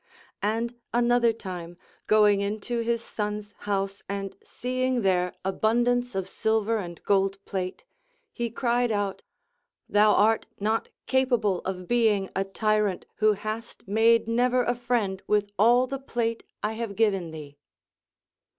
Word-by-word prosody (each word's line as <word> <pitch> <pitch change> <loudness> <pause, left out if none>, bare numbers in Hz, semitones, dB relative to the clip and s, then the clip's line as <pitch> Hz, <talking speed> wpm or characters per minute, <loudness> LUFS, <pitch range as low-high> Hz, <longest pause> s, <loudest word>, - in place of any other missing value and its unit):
And 225 +4 -1 0.2
another 240 -1 +4
time, 180 -5 -7 0.3
going 210 -2 +5
into 215 +4 -2
his 230 0 0
son's 210 -1 -4 0.2
house 195 0 -1
and 195 -1 -4
seeing 255 -1 -1
there 180 -2 +1
abundance 240 +4 +1
of 190 -1 -2
silver 220 +2 0
and 175 -3 -7
gold 195 0 +2
plate, 185 - -4 0.5
he 235 -1 -2
cried 240 0 +1
out: 205 -2 -1 0.7
Thou 210 +1 +5
art 220 +2 +3
not 220 +2 0 0.2
capa 260 -1 +3
ble 200 -5 0
of 185 -1 -4
being 220 -5 +2
a 195 - +1
tyrant, 210 -1 0
who 215 0 +4
hast 215 +3 -6
made 225 +3 +4
never 245 +2 +2
a 240 - +1
friend 235 -6 -1
\vith 205 -1 +2
all 240 +4 +5
the 275 +1 -5
plate 230 -3 -2 0.2
I 210 +1 0
have 225 -2 -4
given 195 -6 +1
thee. 145 -3 -10
215 Hz, 140 wpm, -26 LUFS, 195-235 Hz, 0.7 s, going